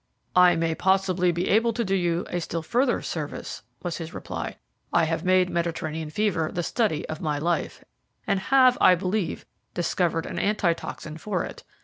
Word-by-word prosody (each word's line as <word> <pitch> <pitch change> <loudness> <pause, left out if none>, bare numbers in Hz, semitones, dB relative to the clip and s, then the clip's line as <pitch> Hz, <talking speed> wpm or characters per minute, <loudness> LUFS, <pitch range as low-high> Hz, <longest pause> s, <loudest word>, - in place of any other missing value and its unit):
"I 180 -1 +7
may 165 0 0
possibly 185 0 +2
be 175 +2 -2
able 230 +2 +3
to 235 0 -1
do 195 - -1
you 175 -2 +1
a 175 - -1
still 165 0 -3
further 245 - +1
service," - - -5 0.2
was 175 -2 -3
his 165 -1 -7
reply. - - -5 0.3
"I 170 - +4
have 165 +1 -1
made 185 0 +4
Mediterranean 160 -2 -2
fever 175 -3 0
the 175 - -2
study 200 -6 0
of 155 0 -6
my 150 -3 -1
life, 170 +3 -2 0.4
and 200 -2 +1
have, 255 +4 +4
I 185 - +7
believe, 185 0 -2 0.3
discovered 175 -1 0
an - - -4
antitoxin 170 -5 -1
for 190 0 -2
it. - - -8
175 Hz, 170 wpm, -25 LUFS, 165-195 Hz, 0.4 s, I